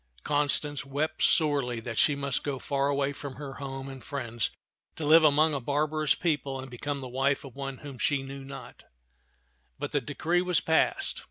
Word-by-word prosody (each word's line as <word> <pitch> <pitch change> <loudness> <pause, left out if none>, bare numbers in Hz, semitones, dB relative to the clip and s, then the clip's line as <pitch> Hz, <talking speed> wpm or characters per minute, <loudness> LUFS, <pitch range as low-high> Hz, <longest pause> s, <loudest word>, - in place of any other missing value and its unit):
Constance 145 -1 +1
wept 145 +4 -2
sorely 140 -6 +3
that 115 0 -5
she 145 - +4
must 140 -2 -1
go 140 -2 -2
far 140 +1 0
away 140 0 +1
from 140 -1 -7
her 140 0 -7
home 135 -1 -5
and 135 -1 -9
friends 120 -6 -2 0.5
to 155 - -4
live 160 +2 +7
among 155 +1 +5
a 140 - 0
barbarous 150 +3 +1
people 145 -5 -1
and 130 -1 -8
become 140 +3 -3
the 130 - -5
wife 135 +3 0
of 130 - -11
one 135 -1 -5
whom 140 -3 -9
she 140 -2 +1
knew 135 0 -7
not; 135 0 -10 0.9
but - - -4
the 145 - +1
decree 160 +8 0
was 180 -2 +2
passed. 355 - +1
140 Hz, 185 wpm, -29 LUFS, 135-150 Hz, 0.9 s, live